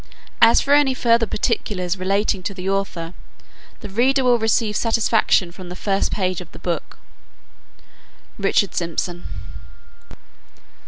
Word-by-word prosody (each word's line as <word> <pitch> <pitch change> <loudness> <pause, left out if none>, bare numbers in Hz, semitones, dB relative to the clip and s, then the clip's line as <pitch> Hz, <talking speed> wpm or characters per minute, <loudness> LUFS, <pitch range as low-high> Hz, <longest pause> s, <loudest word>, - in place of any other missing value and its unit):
As 230 0 +7
for 280 - +1
any 285 -3 +4
further 230 -2 +3
particulars 195 -7 -1
relating 195 +1 0
to 195 +2 -4
the 185 0 -6
author, 195 -4 -2 0.7
the 210 - -7
reader 260 +6 +2
will 245 -1 +4
receive 220 -1 +1
satisfaction 220 -5 +2
from 175 +1 -10
the 180 - -7
first 195 +1 -1
pages 185 -2 -1
of 175 - -12
the - - -10
book. 175 -2 -4 1.4
RICHARD 195 -1 +1
SYMPSON. 175 +1 -3
200 Hz, 125 wpm, -21 LUFS, 180-230 Hz, 1.4 s, As